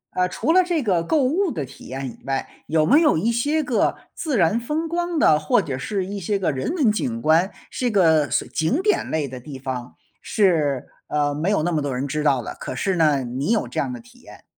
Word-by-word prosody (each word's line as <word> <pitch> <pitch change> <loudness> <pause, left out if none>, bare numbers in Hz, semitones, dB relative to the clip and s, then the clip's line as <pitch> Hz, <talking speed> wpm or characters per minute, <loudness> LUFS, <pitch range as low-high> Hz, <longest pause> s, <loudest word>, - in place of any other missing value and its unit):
呃， 180 0 +1
除 320 - 0
了 370 +1 +6
这 345 -4 -1
个 185 -7 +2
购 290 - +2
物 345 +9 +1
的 150 - -3
体 135 - -14
验 135 +1 -5
以 - - -18
外， 135 0 -2 0.2
有 155 -1 +2
没 290 - +5
有 305 - +4
一 220 +9 +1
些 290 +7 +1
个 245 -4 +1 0.2
自 300 -7 -2
然 185 +4 +3
风 300 +7 -2
光 345 +1 -2
的， 155 - +5
或 150 - +2
者 135 - -3
是 195 +6 -2
一 200 +2 -5
些 200 +3 -1
个 185 -5 0
人 130 -2 -3
文 275 -11 +3
景 120 - -2
观， 160 - +3 0.2
是 250 - -1
个 160 - +3
所 120 - 0
景 160 - 0
点 420 -1 +1
类 155 -3 -1
的 130 -1 -8
地 135 +2 -9
方 130 -2 -6 0.3
是， 155 - +1 0.2
呃， 145 -1 0
没 155 +6 -1
有 205 -7 +1
那 175 - 0
么 155 -3 0
多 140 -3 -2
人 130 +3 -2
知 150 +2 -2
道 135 -5 +2
的， - - -6
可 - - -5
是 195 -2 0
呢， 150 -5 +3
你 125 +6 -3
有 225 - +1
这 - - -4
样 - - -1
的 255 - -6
体 245 +1 -18
验？ - - -15
175 Hz, 260 characters per minute, -22 LUFS, -, 0.3 s, 了